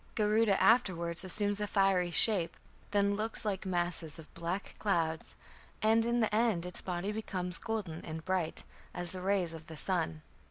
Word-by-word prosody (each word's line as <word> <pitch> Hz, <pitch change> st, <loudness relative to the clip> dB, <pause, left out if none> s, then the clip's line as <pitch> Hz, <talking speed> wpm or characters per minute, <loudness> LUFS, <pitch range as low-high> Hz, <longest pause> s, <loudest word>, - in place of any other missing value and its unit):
Garuda 210 Hz, -1 st, +3 dB
afterwards 175 Hz, -8 st, +3 dB
assumes 205 Hz, +2 st, 0 dB
a 210 Hz, -, 0 dB
fiery 195 Hz, -3 st, +2 dB
shape, 180 Hz, -1 st, +4 dB, 0.3 s
then 200 Hz, 0 st, +2 dB
looks 220 Hz, +1 st, -2 dB
"like 195 Hz, -2 st, -2 dB
masses 175 Hz, -3 st, -2 dB
of 160 Hz, -2 st, -13 dB
black 175 Hz, +4 st, -4 dB
clouds", 165 Hz, -6 st, 0 dB, 0.4 s
and 225 Hz, +1 st, +3 dB
in 240 Hz, 0 st, +2 dB
the 220 Hz, -, +1 dB
end 215 Hz, -6 st, +2 dB
its 180 Hz, -, -4 dB
body 180 Hz, +2 st, -2 dB
becomes 185 Hz, -5 st, -3 dB
golden 205 Hz, -8 st, -4 dB
and 160 Hz, 0 st, -6 dB
bright 185 Hz, -4 st, -1 dB, 0.3 s
"as 175 Hz, -1 st, -3 dB
the 185 Hz, -, -6 dB
rays 185 Hz, -3 st, +1 dB
of 160 Hz, -1 st, -10 dB
the 160 Hz, -, -9 dB
sun". 115 Hz, -, -1 dB
190 Hz, 165 wpm, -32 LUFS, 170-210 Hz, 0.4 s, shape